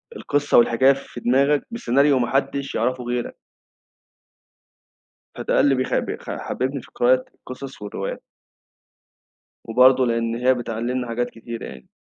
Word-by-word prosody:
القِصّة 145 - +1
والحكاية 120 +3 +5
في 135 -2 -9
دماغك 140 +4 +2
بسيناريو 140 - +2
ما 120 - 0
حدّش 140 0 -1
يعرَفه 125 +2 -1
غيرك. 120 0 -3 2.0
فده - - +1
للي 140 -1 +3
بيخ 130 0 -2
بيخ - - -6
حبّبني 130 +1 -3
في - - -18
قراءة 130 +1 +3
القِصَص 130 -1 -10
والروايات. 100 -1 -5 1.4
وبرضه 130 +3 +5
لأن 115 -1 -1
هي 125 +2 +3
بتعلّمنا 120 +1 -3
حاجات 120 +1 -2
كتيرة 115 0 -8
يعني. 65 -1 -11
125 Hz, 125 wpm, -22 LUFS, 120-135 Hz, 2.0 s, والحكاية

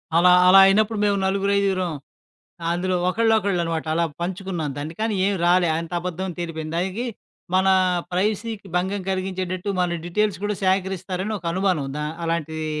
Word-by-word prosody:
అలా, 175 +2 +6 0.2
అలా 190 +1 +8
అయినప్పుడు 215 +3 +3
మేము 200 -1 +2
నలుగురు 195 +1 +1
ఐదుగురం 185 -4 0 0.8
అందులో 185 +2 -1
ఒకళ్ళొకళ్ళనమాట 190 -6 +1
అలా 170 +1 +2 0.2
పంచుకున్నాం 180 -3 -3
దాన్ని. 150 +3 -5
కానీ 220 -1 0
ఏం 200 - +1
రాలే. 175 0 +4
అంత 165 +1 -6
అబద్ధం 180 +1 -4
తేలిపోయింది. 160 -2 -5
దానికి 190 +7 -2 0.5
మన 190 +1 +3 0.5
ప్రైవసీకి 210 +2 -2
భంగం 190 +3 0
కలిగించేటట్టు 185 0 -3
మన 175 -1 0
డీటెయిల్స్ 200 +2 0
కూడా 210 0 0
సేకరిస్తారని 190 +1 -1
ఒక 175 - -9
అనుమానం. 185 -6 0
దా 150 - -2 0.2
అలాంటివి 160 -1 -2
185 Hz, 140 wpm, -23 LUFS, 170-200 Hz, 0.8 s, అలా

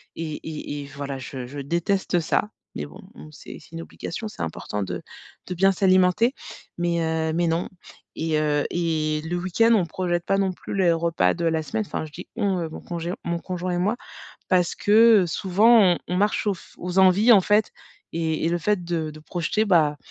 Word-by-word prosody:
et 160 -2 -4
et 150 -2 -5
et - - -9
voilà, 140 -1 -4
je 130 -1 -7
je 140 +3 -8
déteste 175 +5 0
ça. 170 +5 0 0.3
Mais 75 - -4
bon, 75 - -13
on 75 +1 -12
sait - - -11
c'est - - -19
une 165 - -5
obligation, 220 +5 -6
c'est 210 - -9
important 100 +5 -4
de 95 - -5 0.5
de 180 - -3
bien 195 +2 +4
s'alimenter 185 +5 +3 0.4
mais 170 0 0
heu 160 0 -1
mais 170 +1 +1
non. 165 +2 0 0.5
Et 160 -1 -1
heu 150 -1 +1
et 155 -3 -1
le 175 +2 -2
week-end 185 +6 +2
on 200 -6 +3
projette 175 -1 -2
pas 195 - +1
non 190 -2 +1
plus - - -7
les 185 -3 +3
repas 165 - +1
de 170 - -3
la 160 -1 +1
semaine. 110 -7 -2
Enfin, - - -4
je 155 - -12
dis: - - -10
«On», 200 -5 0
heu, 165 - -3
mon - - -9
congé 170 0 -4
mon 170 0 -2
conjoint 180 0 -4
et 175 - -1
moi. 205 +6 +1 0.5
parce 180 -2 +2
que 215 -1 +5
souvent 205 +7 +4
on - - -3
on 180 - -2
marche 205 +2 +1
aux 205 - +3
f - - -16
aux 180 +1 -4
envies 190 +5 +6
en 200 - +8
fait. 210 +3 +2 0.4
Et 160 -1 -1
et - - +2
le 175 0 0
fait 195 +1 0
de 165 -2 -2
de 155 - -11
projeter 175 +7 -1
bah, 155 -6 +3
170 Hz, 210 wpm, -24 LUFS, 160-190 Hz, 0.5 s, en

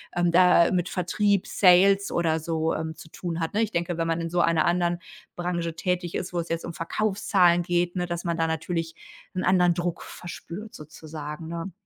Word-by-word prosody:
ähm, 175 0 +2
da 180 -1 +5
mit 180 -2 0
Vertrieb, 200 +2 +1
Sales 195 +2 +4
oder 160 -2 +1
so, 160 0 -1
ähm, 160 0 -4
zu 160 - -13
tun 170 0 -5
hat, 165 -1 -2
ne? 215 - +1
Ich 220 - +1
denke, 175 -3 -2
wenn 165 - 0
man 165 0 0
in 165 0 -4
so 175 - 0
einer 165 -2 +3
anderen 175 0 +1 0.4
Branche 175 -2 -2
tätig 180 -1 -2
ist, 180 - -4
wo 175 - 0
es 170 - -4
jetzt 165 0 -2
um 170 - -6
Verkaufszahlen 190 0 +2
geht, 175 +1 0
ne, 180 -1 -1
dass 175 0 -4
man 170 -1 -1
da 165 - +1
natürlich 165 0 -3 0.4
'n 185 - -1
anderen 180 -1 +4
Druck 175 -1 -2
verspürt, 180 +4 -9
sozusagen, 155 +1 -8
ne? 170 +3 -5
175 Hz, 200 wpm, -26 LUFS, 165-180 Hz, 0.4 s, da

